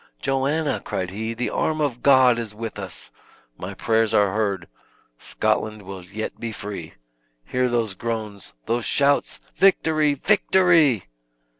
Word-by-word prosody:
"Joanna!" 140 - 0
cried 90 -1 -4
he, 110 +3 -4
"the 120 +2 -2
arm 155 0 0
of 135 -5 -1
God 130 -3 +5
is 110 -3 -6
with 115 -1 -6
us. 95 -3 -7 0.4
My - - -7
prayers 110 -1 +1
are 100 -2 +3
heard. 100 -4 -1 0.5
Scotland 110 -1 -1
will 95 -1 -8
yet 105 +5 -6
be 115 -1 -4
free. 100 -6 -7 0.5
Hear 125 0 0
those 115 -4 0
groans 105 -2 -5
those 120 0 -1
shouts. 140 +3 +1 0.2
Victory! 155 -6 +3
victory!" 170 - +3
115 Hz, 135 wpm, -23 LUFS, 105-140 Hz, 0.5 s, God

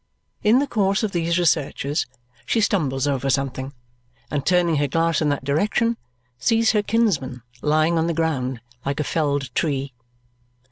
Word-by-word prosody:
In 215 +4 +5
the 280 - +2
course 200 -5 +1
of 215 - 0
these 170 -1 0
researches 155 -4 0 0.4
she 230 - +2
stumbles 145 -11 +1
over 140 -1 0
something, 135 0 -1 0.6
and 145 -2 -1
turning 175 -2 +2
her 145 0 +1
glass 165 +2 +1
in 150 - +2
that 145 -1 -1
direction, 210 - +1 0.4
sees 225 - +3
her 210 - +2
kinsman 175 - 0 0.2
lying 155 +2 +2
on 160 - +1
the 170 - -1
ground 135 -7 -1 0.2
like 140 +1 -2
a - - +1
felled 145 -4 -1
tree. 140 -3 -1
155 Hz, 155 wpm, -22 LUFS, 140-185 Hz, 0.6 s, In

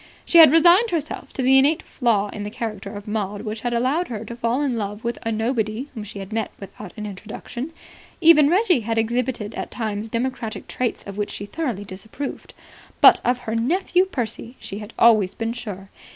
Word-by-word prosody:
She 340 - +6
had 315 -4 +10
resigned 350 +8 +6
herself 310 -5 -4
to 265 - -2
the 265 +1 +6
innate 295 +4 +2
flaw 215 -5 0
in 205 - -7
the 205 - -4
character 210 -3 -5
of 205 +1 -8
Maud 205 -1 -3
which 215 0 -5
had 240 - -2
allowed 260 +9 +1
her 225 -2 -5
to 235 - -7
fall 240 +4 0
in 265 -4 0
love 210 -1 -4
with 235 0 -3
a 225 - -2
nobody 225 +2 -1
whom 220 -4 -6
she 205 - -9
had 195 +2 -7
met 225 0 -1
without 195 -1 -10
an 210 - -5
introduction. 220 - -7 0.5
Even 315 -4 +7
Reggie 365 - +3
had 225 0 -2
exhibited 230 -1 -1
at - - -5
times 215 -1 -4
democratic 230 -1 -3
traits 250 -2 -2
of 200 0 -8
which 205 -1 -2
she 205 - -6
thoroughly 240 - -3
disapproved. 215 +8 -7 0.4
But - - +8
of 245 0 +2
her 220 -2 -4
nephew 355 +10 +2
Percy 240 - -4
she 200 - -6
had 210 +1 -9
always 215 -5 +5
been 225 0 -2
sure. 200 -5 -7
230 Hz, 200 wpm, -22 LUFS, 210-265 Hz, 0.5 s, had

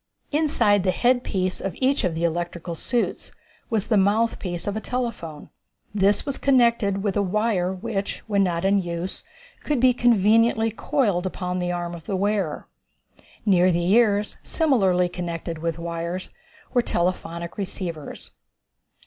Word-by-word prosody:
Inside 285 -10 +3
the 185 - 0
headpiece 200 -5 +1
of 195 - -3
each 270 +2 +1
of 180 -4 0
the 165 - -2
electrical 170 0 -2
suits 235 +8 -2 0.4
was 220 -4 0
the 220 - +2
mouthpiece 200 -3 +1
of 205 - -2
a - - -1
telephone. 230 -13 -4 0.4
This 200 0 +2
was 280 -2 -3
connected 235 -7 +3
with 200 -3 0
a 205 - +2
wire 200 -2 0
which, 195 +1 -4
when 205 -2 +1
not 175 -1 -1
in 195 0 +3
use, 175 +1 -5 0.4
could 295 -4 -1
be 255 +1 +5
conveniently 225 -1 +3
coiled 210 -7 0
upon 180 0 -3
the 175 0 -1
arm 175 -1 -3
of 165 -2 -10
the 195 - -1
wearer. 195 -5 -1 0.8
Near 185 -3 +4
the 175 +1 +1
ears, 210 -2 +3
similarly 195 - +2
connected 170 -2 -5
with 165 0 -2
wires, 170 +2 -4 0.4
were 245 - +4
telephonic 170 -3 -2
receivers. 175 -6 -5
195 Hz, 145 wpm, -24 LUFS, 175-225 Hz, 0.8 s, be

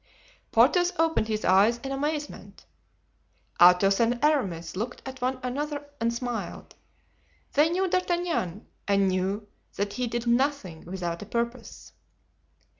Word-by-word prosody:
Porthos 355 0 +4
opened 325 -8 +2
his 215 -1 -2
eyes 200 +6 +4
in 270 - -4
amazement; 295 +2 -4 1.0
Athos 180 +3 +6
and 235 +1 +2
Aramis 185 - 0
looked 235 +7 -5
at 265 -1 -8
one 255 +1 -1
another 290 +3 -3
and 230 0 +1
smiled; 240 0 -5 0.8
they 300 +3 +4
knew 370 +3 0
D'Artagnan, 345 - -1 0.2
and 200 -1 +3
knew 190 +3 -1 0.3
that 200 0 -2
he 250 -1 -2
did 235 +1 -3
nothing 240 - 0
without 175 -2 -4
a 205 - -8
purpose. 235 +2 -4
235 Hz, 125 wpm, -27 LUFS, 195-290 Hz, 1.0 s, Athos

